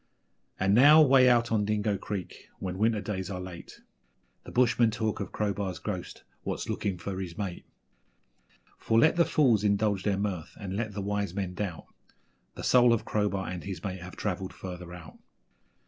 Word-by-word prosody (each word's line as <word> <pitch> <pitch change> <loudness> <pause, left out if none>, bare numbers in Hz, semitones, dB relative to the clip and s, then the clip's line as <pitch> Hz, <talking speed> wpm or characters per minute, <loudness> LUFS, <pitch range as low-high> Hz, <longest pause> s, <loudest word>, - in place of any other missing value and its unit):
And 95 +1 +2
now, 145 +7 +8
way 135 -4 +6
out 120 -1 +3
on 110 -2 +2
Dingo 105 0 0
Creek, 95 -1 -6
when 95 -1 -5
winter 110 -1 +2
days 95 -3 -4
are 90 -2 -4
late, 90 -2 -9 0.6
The - - -9
bushmen 120 -2 +3
talk 110 -1 -2
of - - -5
Crowbar's 100 -3 -2
ghost 95 -4 -6 0.2
'what's - - -4
looking 95 -3 -2
for 95 +2 -5
his 85 -3 -7
mate'; 100 -4 -5 1.1
For 110 - +1
let 155 +9 +5
the 170 -1 +4
fools 120 -9 +3
indulge 100 -1 +1
their 100 0 0
mirth, 95 -5 -3
and 95 -2 -5
let 110 0 -3
the 100 - -4
wise 100 -2 -2
men 95 -3 -3
doubt 90 -3 -4 0.7
The - - -7
soul 125 -1 +5
of 115 - -1
Crowbar 100 -3 -1
and 90 -1 -5
his 95 -4 -6
mate 95 -2 -4
have 90 +1 -9
travelled 95 -2 -3
further 90 -2 -8
out. 85 -2 -11
100 Hz, 180 wpm, -28 LUFS, 95-110 Hz, 1.1 s, now